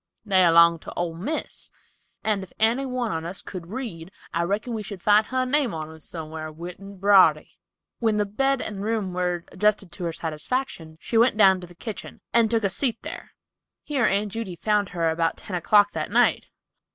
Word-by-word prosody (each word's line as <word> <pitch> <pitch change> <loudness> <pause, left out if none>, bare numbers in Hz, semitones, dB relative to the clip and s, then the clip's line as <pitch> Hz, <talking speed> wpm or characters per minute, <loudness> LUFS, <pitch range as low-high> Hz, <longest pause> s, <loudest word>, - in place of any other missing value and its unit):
They 190 -3 +4
'longed 170 0 +6
to - - -9
old 165 -1 -3
Miss, 300 - -4 0.5
and 210 -2 +1
if 190 - -10
any 235 +5 +2
one 250 -3 -2
on 160 0 -3
us 175 +3 -6
could 180 -3 -8
read, 190 -7 -6 0.2
I 170 - +1
reckon 205 +7 -1
we 220 - -3
should 200 -3 -8
find 210 +1 +5
her 255 0 0
name 255 - +1
on 155 0 -5
'em 160 - -13
somewhar 155 0 -6
writ 175 +3 -8
in 200 0 -11
brawdery." 195 0 +4 0.4
When 220 -3 +1
the 210 - +2
bed 270 +6 0
and 200 -2 -5
room 215 -4 -1
were 180 -1 -1
adjusted 205 -1 +1
to 175 +1 -6
her 170 - -1
satisfaction, 160 - -4
she 225 - 0
went 235 -2 +4
down 190 -3 +6
to 180 - -9
the 175 - -16
kitchen 215 +4 -8
and 230 -2 +4
took 225 -1 +1
a 200 - +2
seat 235 +3 -1
there. - - -8 0.5
Here 270 -6 +1
Aunt 200 +1 0
Judy 215 -4 -5
found 210 +1 +1
her 165 -2 0
about 165 0 0
ten 185 - -6
o'clock 205 +4 +4
that - - -3
night. - - +3
195 Hz, 200 wpm, -25 LUFS, 170-225 Hz, 0.5 s, longed